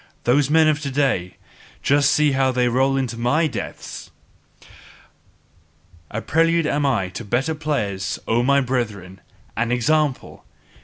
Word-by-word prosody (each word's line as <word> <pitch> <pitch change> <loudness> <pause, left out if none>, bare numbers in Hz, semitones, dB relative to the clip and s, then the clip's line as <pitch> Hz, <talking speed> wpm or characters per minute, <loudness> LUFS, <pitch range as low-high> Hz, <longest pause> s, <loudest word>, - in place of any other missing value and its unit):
Those 135 +3 +2
men 160 +1 +4
of 155 -1 +2
to 140 - -3
day, 130 -10 0
see 90 - -22 0.5
just 145 +1 +3 0.2
how 135 -1 +2
they 125 -1 +1
roll 135 +3 +1
into 120 -3 -3
my 145 +8 +2
depths! 120 -10 -6 2.0
A 115 - -5
prelude 165 +1 +2
am 145 -1 0
I 105 -9 0
to 105 - -7
better 125 +9 -1
players, 125 -12 -2
O 115 +1 +2
my 140 +3 +3
brethren! 105 -8 -4 0.3
An 115 +2 -1
example! 140 +3 0
130 Hz, 140 wpm, -21 LUFS, 115-145 Hz, 2.0 s, men